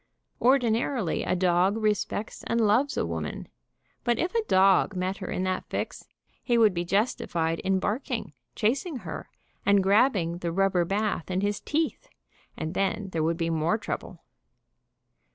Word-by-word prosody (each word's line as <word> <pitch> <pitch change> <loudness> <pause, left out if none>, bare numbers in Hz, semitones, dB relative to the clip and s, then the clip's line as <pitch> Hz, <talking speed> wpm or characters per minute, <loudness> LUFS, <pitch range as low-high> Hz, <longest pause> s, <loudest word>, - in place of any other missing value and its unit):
Ordinarily 240 - +2
a - - 0
dog 180 +3 +2
respects 210 0 -1
and 230 - +1
loves 230 +6 +2
a - - +1
woman, - - -4 0.6
but 240 -1 +1
if 345 +7 -1
a 460 - +2
dog 195 - +4
met 185 +1 -2
her 190 - -6
in 185 - -2
that 185 0 -2
fix, - - -4 0.3
he 240 -2 +1
would 220 -4 +5
be 175 0 -1
justified 170 -4 0
in 190 0 +1
barking, 225 - -2 0.2
chasing 275 +9 0
her, - - -6 0.3
and 200 -1 +4
grabbing 195 -5 +3
the 170 -1 -2
rubber 185 -1 +2
bath 200 -2 -1
in 185 +1 0
his 205 0 0
teeth, 315 +1 -2 0.5
and 160 +1 -4
then 195 +1 -1
there 165 - -1
would 165 +1 +1
be 165 -1 -1
more 165 +6 +1
trouble. 210 - -6
195 Hz, 155 wpm, -27 LUFS, 180-230 Hz, 0.6 s, would